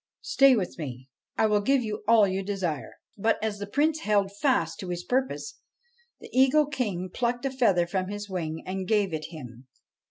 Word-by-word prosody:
Stay 275 Hz, -1 st, +5 dB
with 185 Hz, -5 st, -3 dB
me: 130 Hz, -3 st, -7 dB, 0.3 s
I -, -, +4 dB
will 210 Hz, -1 st, +3 dB
give 270 Hz, +4 st, +2 dB
you 215 Hz, -1 st, -4 dB
all 220 Hz, -3 st, +6 dB
you 190 Hz, +1 st, -1 dB
desire.' 190 Hz, -7 st, -3 dB, 0.2 s
But, 225 Hz, +3 st, +2 dB
as 210 Hz, -2 st, -2 dB
the 205 Hz, -, -5 dB
Prince 305 Hz, +8 st, +1 dB
held 200 Hz, -4 st, +1 dB
fast 205 Hz, -, +1 dB
to 185 Hz, -, -6 dB
his 175 Hz, 0 st, -3 dB
purpose, 265 Hz, -, -2 dB, 0.6 s
the -, -, -12 dB
Eagle 270 Hz, +4 st, +5 dB
King 210 Hz, -, -3 dB
plucked 240 Hz, +1 st, -1 dB
a 270 Hz, -, 0 dB
feather 205 Hz, -10 st, +3 dB
from 185 Hz, +1 st, -2 dB
his 205 Hz, +1 st, -5 dB
wing 160 Hz, -4 st, -4 dB
and 185 Hz, 0 st, -4 dB
gave 205 Hz, -4 st, +1 dB
it 155 Hz, -1 st, -3 dB
him. 130 Hz, -6 st, -10 dB
205 Hz, 190 wpm, -27 LUFS, 175-245 Hz, 0.6 s, all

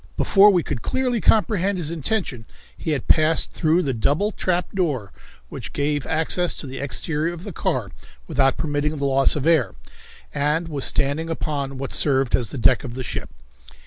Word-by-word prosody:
Before 200 Hz, +1 st, +6 dB
we 180 Hz, -5 st, +3 dB
could 115 Hz, -, -4 dB
clearly 250 Hz, -4 st, -1 dB
comprehend 200 Hz, -3 st, +2 dB
his 165 Hz, -3 st, -3 dB
intention 160 Hz, -, -3 dB, 0.3 s
he -, -, -5 dB
had 145 Hz, -5 st, -2 dB
passed 155 Hz, +1 st, +3 dB
through 165 Hz, +2 st, +2 dB
the 135 Hz, -, -1 dB
double 145 Hz, -, +1 dB
trapped 180 Hz, -3 st, -2 dB
door 145 Hz, -, -1 dB, 0.4 s
which -, -, -8 dB
gave 145 Hz, 0 st, -1 dB
access 165 Hz, +2 st, +1 dB
to -, -, -5 dB
the 135 Hz, 0 st, -7 dB
exterior 150 Hz, +3 st, -1 dB
of 175 Hz, 0 st, -9 dB
the 200 Hz, -, -7 dB
car -, -, -2 dB, 0.4 s
without 135 Hz, 0 st, +2 dB
permitting 150 Hz, 0 st, -1 dB
the 140 Hz, -, -2 dB
loss 135 Hz, 0 st, +3 dB
of 150 Hz, -2 st, -2 dB
air, 135 Hz, -, +2 dB, 0.6 s
and 150 Hz, +4 st, 0 dB
was 145 Hz, -4 st, -2 dB
standing 145 Hz, +3 st, 0 dB
upon 140 Hz, -4 st, -3 dB
what 135 Hz, 0 st, -5 dB
served 135 Hz, -3 st, +3 dB
as 120 Hz, -5 st, -2 dB
the -, -, -5 dB
deck 120 Hz, -, +3 dB
of 120 Hz, -3 st, -7 dB
the 130 Hz, -, -4 dB
ship. -, -, -5 dB
150 Hz, 180 wpm, -22 LUFS, 135-175 Hz, 0.6 s, Before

